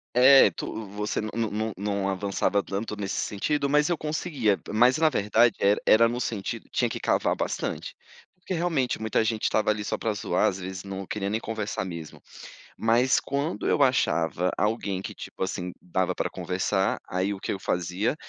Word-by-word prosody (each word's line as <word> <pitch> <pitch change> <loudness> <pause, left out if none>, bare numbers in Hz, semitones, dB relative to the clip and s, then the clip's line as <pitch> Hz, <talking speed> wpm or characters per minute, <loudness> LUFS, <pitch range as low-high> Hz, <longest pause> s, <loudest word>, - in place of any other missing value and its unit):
É, 135 +2 +8
tu, 110 - -6
você 105 +1 -3
não 110 0 -4 0.2
não 110 0 -2
não 100 0 -2
avançava 100 +1 0
tanto 100 +4 -4
nesse 100 -2 -3
sentido, 140 +8 -1
mas 150 +3 +3
eu 175 - +1
conseguia, 150 - 0
mas 120 +5 +4
na 160 -1 +5
verdade 115 0 +3
era 100 +1 +3
era 115 +2 +7
no 120 +2 -3
sentido, 105 -5 -4
tinha - - +1
que - - -5
cavar - - +1
bastante. - - -3 0.4
Porque 180 +1 -6
realmente 160 -7 0
muita 110 0 +1
gente 110 -1 -1
estava 110 0 +2
ali 105 0 -2
só - - -2
para 110 - -1
zoar, 90 -3 +1
às 95 0 -5
vezes 95 0 -6
não 95 -1 -6
queria 100 -1 -3
nem 110 - 0
conversar 110 -4 -3
mesmo. 85 -4 -8 0.6
Mas 120 +3 +3
quando 140 +4 -2
eu - - +2
achava 90 -9 +2
alguém, 105 -3 -1
que - - -7
,tipo - - -10
assim, 90 -1 -2
dava 90 +1 -1
para - - -2
conversar, 95 +1 -1
aí 95 +2 0
o 100 - -7
que - - -3
eu 95 - -3
fazia? 90 - -1
105 Hz, 185 wpm, -26 LUFS, 95-120 Hz, 0.6 s, É